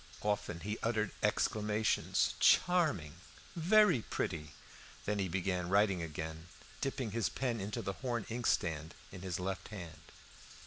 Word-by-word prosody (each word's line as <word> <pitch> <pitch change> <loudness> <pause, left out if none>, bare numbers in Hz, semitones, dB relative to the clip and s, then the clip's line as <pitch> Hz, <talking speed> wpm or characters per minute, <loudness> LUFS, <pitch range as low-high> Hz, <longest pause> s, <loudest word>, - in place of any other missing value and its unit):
Often 105 -5 -1
he 105 +2 -3
uttered 110 -2 0
exclamations. 105 0 +1
"Charming! 155 - +3 0.4
very 180 - +5
pretty." 75 -7 -3 0.5
Then 105 0 0
he 95 - +1
began 90 0 -1
writing 100 -2 +3
again, 80 +1 -5 0.3
dipping 135 -5 -2
his 115 -1 0
pen 120 -5 -2
into 100 +2 -3
the 100 - -2
horn 120 0 -3
inkstand 85 -9 -1 0.2
in 95 - -9
his 90 -2 -3
left 95 +1 -3
hand. 90 -7 -8
100 Hz, 130 wpm, -34 LUFS, 90-115 Hz, 0.5 s, very